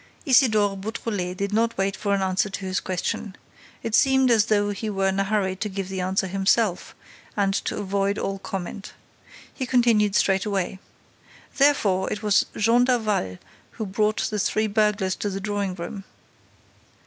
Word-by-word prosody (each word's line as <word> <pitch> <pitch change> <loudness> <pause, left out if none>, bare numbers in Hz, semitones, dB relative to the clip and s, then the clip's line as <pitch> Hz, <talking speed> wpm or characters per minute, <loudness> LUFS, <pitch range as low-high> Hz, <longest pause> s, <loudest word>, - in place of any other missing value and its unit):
Isidore 215 -7 +4
Beautrelet 195 -3 -4
did 200 +1 -2
not 230 +1 +1
wait 195 +1 0
for 200 -1 0
an 195 - -1
answer 190 +2 0
to 195 0 -6
his 185 0 -1
question. 190 +2 -3 0.5
It 225 -2 -4
seemed 265 +1 +4
as 220 -3 +4
though 205 -1 +2
he 215 +2 -4
were 195 -1 +1
in 190 +1 -1
a - - +3
hurry 195 -2 0
to 210 - -3
give 195 -1 -5
the 190 -1 -3
answer 190 +1 0
himself 195 +1 0 0.4
and 195 -1 +2
to - - -2
avoid 200 0 -1
all 195 0 -3
comment. 195 +1 -6 0.6
He 260 - -4
continued 230 -5 +3
straightway: 195 -1 +1 0.8
"Therefore 220 -10 +2
it 210 - -4
was 205 -1 +3
Jean 230 +3 +4
Daval 215 - 0 0.4
who 220 - -4
brought 210 +2 0
the 210 - -1
three 215 +2 +1
burglars 210 -3 +1
to 205 - -2
the 195 0 -4
drawing 200 -2 -2
room. 185 +3 -6
200 Hz, 165 wpm, -24 LUFS, 195-215 Hz, 0.8 s, Isidore